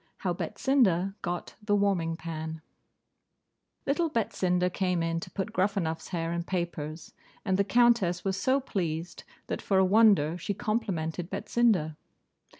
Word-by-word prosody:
HOW 180 -2 -1
BETSINDA 195 -4 +1
GOT 175 0 -4
THE 210 -1 +1
WARMING 185 -5 +1
PAN 160 -1 -6 1.2
Little 320 +4 +1
Betsinda 185 -7 0
came 180 -3 0
in 165 0 -1
to - - -8
put 195 - -4
Gruffanuff's 185 -4 0
hair 165 -2 -2
in 170 - -1
papers; 170 -3 -4 0.3
and 190 -3 +2
the 200 - +3
Countess 205 -4 +3
was 190 -1 +1
so 260 +8 +2
pleased, 175 - -3 0.2
that, - - -4
for 195 - +1
a 190 - +5
wonder, 185 -6 +4
she 200 - -3
complimented 185 -7 -2
Betsinda. 190 -13 +1
185 Hz, 140 wpm, -29 LUFS, 165-205 Hz, 1.2 s, a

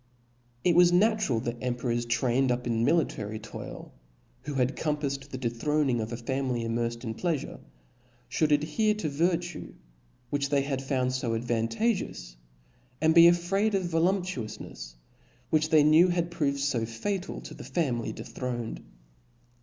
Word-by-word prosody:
It 175 -2 +3
was 175 0 +7
natural, 195 - +3
that 120 0 -3
emperors 120 -1 -1
trained 125 +2 +2
up 125 0 -1
in 115 -1 0
mili 165 +6 +3
tary 105 +1 -6
toil, 110 0 -9 0.5
who 145 -1 -4
had 130 +1 +1
compaffed 145 -3 -2
the 130 - -5
dethroning 130 +1 0
of 110 +1 -4
a 120 - -3
family 125 0 -2
immerfed 115 +1 -2
in 110 -2 -3
pleafure, 160 +3 -2 0.7
IhouJd 155 -1 +1
adhere 160 +9 +2
to 180 -8 -2
virtue, 170 +3 -1 0.6
which 140 -1 0
they 140 -1 +2
had 135 -1 -2
found 130 -2 0
fo 115 -3 -1
advantageous^ 115 - -1 0.6
and 160 +1 +4
be 170 0 +9
afraid 195 +5 +2
of 190 - +1
voluptuoufnefs, 165 - -2 0.6
which 155 0 +2
they 155 -2 +6
knew 155 +4 +6
had 175 -1 0
proved 140 -4 -1
fo 130 -5 0
fatal 180 - -3
to - - -9
the - - -10
family 130 -9 -1
dethroned. 120 -3 -5
140 Hz, 145 wpm, -28 LUFS, 120-170 Hz, 0.7 s, be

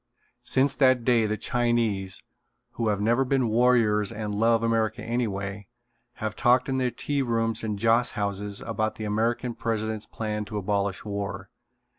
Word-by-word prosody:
Since 135 +1 +3
that 130 -3 +4
day 115 -3 +3
the 110 0 -1
Chinese, 115 -5 0 0.5
who 115 -1 -2
have 105 -2 +1
never 120 +5 +2
been 130 -2 +1
warriors 110 -3 +3
and 105 -1 -4
love 115 +2 +2
America 115 -1 0
anyway, 100 -4 -3 0.5
have 110 -2 -4
talked 125 +2 +3
in 130 -1 0
their 125 -1 +1
tea 140 +3 -2
rooms 115 -3 0
and 105 -2 -2
joss 115 +3 +2
houses 100 -1 -3
about 110 -1 -2
the 110 - -6
American 115 +3 0
President's 110 -1 -3
plan 105 -1 -3
to 105 +1 -5
abolish 100 0 -1
war. 100 -2 -5
110 Hz, 155 wpm, -26 LUFS, 105-120 Hz, 0.5 s, that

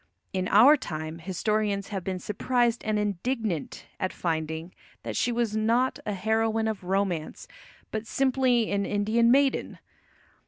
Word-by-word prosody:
In 185 -1 -1
our 245 +11 +7
time 160 - -6
historians 200 +3 -1
have 195 -4 -4
been 190 0 -3
surprised 235 +5 0
and 215 -1 0
indignant 210 - -2
at 185 - -1
finding 160 0 -3 0.3
that - - -5
she 245 - +1
was 235 -3 -1
not 230 +4 +1
a 210 - 0
heroine 220 +3 0
of 215 -4 -3
romance, 185 -4 -2 0.4
but 220 0 -4
simply 255 -3 +2
an 200 0 +1
Indian 215 +4 +2
maiden. 275 +2 +2
210 Hz, 135 wpm, -27 LUFS, 185-235 Hz, 0.4 s, our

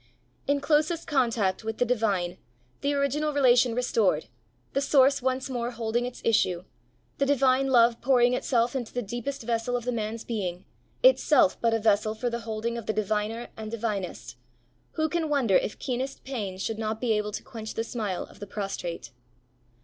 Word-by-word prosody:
In 285 0 +2
closest 310 +3 +1
contact 230 -9 +1
with 220 0 -4
the 245 - +2
divine, 200 -7 0 0.4
the 285 - +1
original 290 +2 0
relation 250 -4 +4
restored, 220 - +1 0.5
the 275 - +1
source 275 -1 +4
once 260 +1 -1
more 240 -3 -2
holding 235 0 -1
its 250 - -9
issue, 185 -6 +2 0.6
the 280 - +3
divine 270 -1 +3
love 235 -2 +4
pouring 245 -1 +4
itself 245 -1 +1
into 245 -4 -3
the 245 - -2
deepest 240 +5 -5
vessel 235 +1 -1
of 240 - -7
the 250 - 0
man's 225 -1 -3
being, 185 -6 -4 0.4
itself 430 - +5
but 230 -1 +3
a - - +3
vessel 215 0 +2
for 240 +2 -2
the 235 - -2
holding 230 +1 -3
of 225 - -11
the 220 - +1
diviner 215 +2 -2
and 220 -1 -6
divinest, 210 - -4 0.6
who 315 0 +1
can 325 -1 -1
wonder 260 -10 +2
if - - +1
keenest 265 +1 -4
pain 210 -8 -4
should 220 +3 -3
not 220 0 -2
be 245 -1 0
able 210 0 -1
to - - -5
quench 220 -3 -8
the 225 - -1
smile 215 -6 -3
of - - -15
the 205 - -7
prostrate! 190 - -5
235 Hz, 180 wpm, -27 LUFS, 215-260 Hz, 0.6 s, itself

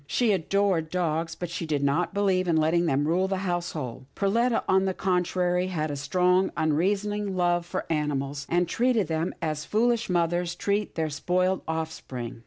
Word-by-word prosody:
She 235 - +2
adored 190 -2 +1
dogs, 165 -2 -1
but 175 0 -5
she 170 -1 -4
did 145 -2 0
not 150 +5 +1
believe 190 -2 +1
in 170 - +2
letting 165 +2 +2
them 145 0 +1
rule 180 +4 +2
the 190 0 -2
household. 160 -9 -3
Perletta, 230 +4 +1
on 190 0 +3
the 190 -1 -1
contrary, 180 -1 0
had 155 -4 -2
a - - -3
strong 180 +6 +2
unreasoning 195 +5 0
love 175 -1 +1
for - - -3
animals, 145 -3 -2
and 175 +1 +2
treated 230 0 +1
them 160 +2 -1
as 155 -1 -2
foolish 235 +4 +1
mothers 175 0 0
treat 205 +2 -1
their 160 -2 -1
spoiled 180 +5 0
offspring. 160 -8 -5
175 Hz, 170 wpm, -26 LUFS, 160-190 Hz, -, on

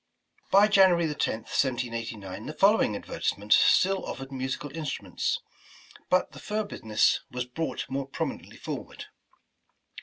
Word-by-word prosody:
By 200 +2 +6
January 190 -5 +5
10th, 155 - -1 0.4
1789, 115 -6 -2
the 150 - -6
following 200 - +4
advertisement 105 +1 -1
still 195 +1 +4
offered 135 0 -6
musical 135 +2 -4
instruments, 135 - -2 0.7
but 185 - +2
the - - -11
fur 215 +1 -2
business 110 - +1
was 125 0 -3
brought 130 +2 -3
more 135 +1 -3
prominently 135 - -5
forward. - - -7
135 Hz, 120 wpm, -27 LUFS, 115-180 Hz, 0.7 s, By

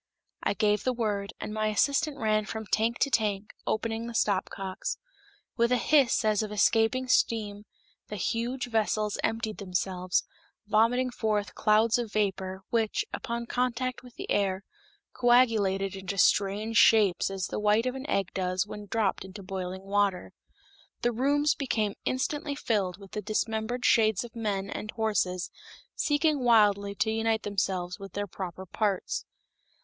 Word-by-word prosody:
I - - 0
gave 210 -2 +2
the 255 - +1
word, 210 -4 -2
and 210 - -5
my 215 0 0
assistants 280 +7 +1
ran 215 -1 +1
from 220 +1 -5
tank 225 +3 +1
to 280 - +2
tank, 210 -3 0
opening 225 +1 -1
the 235 - -7
stopcocks. 195 -1 -1 0.6
With 235 0 +2
a 250 - +4
hiss 270 -5 +3
as 215 -1 +3
of 215 -1 -4
escaping 225 +4 +2
steam 210 -4 +1 0.4
the 210 - -6
huge 235 +6 -2
vessels 215 -1 0
emptied 225 -1 -2
themselves, 185 -1 -1 0.4
vomiting 235 +4 +2
forth 210 -4 -1
clouds 215 +2 +3
of 230 -3 -4
vapor, 190 -3 -1
which, 230 - +1
upon 235 -1 -3
contact 250 +1 -1
with 250 -2 -15
the - - -7
air, 195 -1 +1 0.5
coagulated 220 -6 +3
into 195 +1 -5
strange 205 +4 +2
shapes 215 -6 +5
as 195 -2 -3
the - - -4
white 210 +2 +3
of 255 - 0
an 265 +2 -7
egg 195 -2 +1
does 185 0 0
when 210 0 -8
dropped 205 -3 0
into 190 +1 -10
boiling 185 0 -5
water. 200 -1 0 0.7
The 240 - +3
rooms 285 +5 +2
became 220 -7 -1
instantly 285 +2 -1
filled 200 -9 -1
with 195 -1 -14
dismembered 220 +3 -1
shades 220 -3 +4
of 240 0 -11
men 205 -4 -2
and 210 - -6
horses 205 -5 -1 0.4
seeking 295 0 +2
wildly 205 -4 +4
to 220 - +1
unite 225 0 0
themselves 185 -3 -2
with 195 0 -9
their 205 0 -2
proper 190 -1 -7
parts. 200 0 -1
215 Hz, 150 wpm, -28 LUFS, 195-235 Hz, 0.7 s, shapes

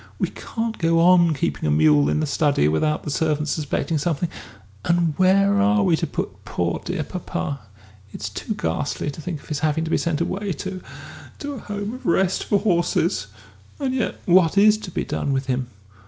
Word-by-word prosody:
We - - -1
can't 225 -1 -4
go 165 0 +3
on 170 -2 +5
keeping 75 - -1
a - - +2
mule 75 -1 +4
in 75 0 +1
the - - +1
study 145 - +2
without 150 - +1
the 150 - -4
servants 150 0 0
suspecting 155 +1 -1
something, 165 +1 -1 0.5
and 170 -2 +2
where 195 +2 +4
are 210 0 +3
we 180 -4 +4
to - - -2
put - - -5
poor, - - -2
dear - - -2
papa? 110 +12 -4 0.5
It's - - -5
too - - -4
ghastly 140 - -2
to 150 - -9
think 160 -2 -5
of - - -17
his 150 -2 -2
having 155 +1 0
to 165 - -4
be - - +2
sent 170 -3 -1
away 195 +3 -2
to 185 +4 -6 0.6
to 290 0 -5
a 265 - -6
Home 205 +1 -5
of 255 - -8
Rest 185 +2 +2
for 205 - +2
Horses 175 - +1 0.5
and 270 -2 -1
yet 255 -3 -2
what 180 0 +4
is 210 +1 +6
to 205 - -7
be - - -2
done 140 - -2
with 135 0 -1
him?... 130 -1 -1
165 Hz, 200 wpm, -22 LUFS, 145-195 Hz, 0.6 s, is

